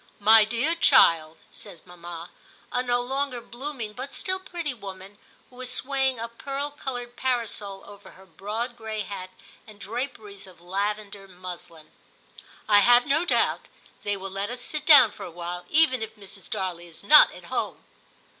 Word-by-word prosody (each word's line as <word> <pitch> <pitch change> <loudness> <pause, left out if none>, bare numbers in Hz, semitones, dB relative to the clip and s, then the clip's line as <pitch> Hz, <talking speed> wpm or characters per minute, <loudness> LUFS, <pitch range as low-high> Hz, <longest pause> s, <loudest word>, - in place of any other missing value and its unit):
* - - -34
My 220 -1 +8
dear 240 +9 +1
child/ 165 - +5
says 170 - -12
mamma, 175 -1 -10 0.4
a 250 - +1
no 245 -1 +1
longer 265 0 -2
blooming, 240 -2 -7
but 260 +4 -7
still 375 0 -1
pretty 340 -6 -5
woman, 195 -2 -10 0.3
who 250 - -18
was 255 0 -4
swaying 265 -1 0
a 230 - -3
pearl 275 +5 -4
coloured 245 -4 -6
parasol 225 -6 -2
over 205 0 -14
her 190 - -17
broad 210 +8 -5
gray 220 -2 -5
hat 190 -2 -7 0.4
and 210 -1 -14
draperies 215 -3 -6
of 185 -2 -17
lavender 200 +2 -4
muslin, 180 -3 -10 0.4
* - - -15 0.3
I 205 -1 +6
have 245 +4 +5
no 310 +4 +2
doubt - - +1 0.3
they 205 -1 -2
will 195 0 -7
let 195 +2 -3
us 245 +1 -4
sit 305 +2 -3
down 265 -8 +9
for - - -14
a - - -7
little, 175 +1 -6
even 295 -6 +3
if 220 - -5
Mrs. 200 -2 -10
Darley 180 -4 -4
is 165 +2 -12
not 300 +8 +8
at - - -13
home.' - - -3
220 Hz, 175 wpm, -25 LUFS, 195-255 Hz, 0.4 s, down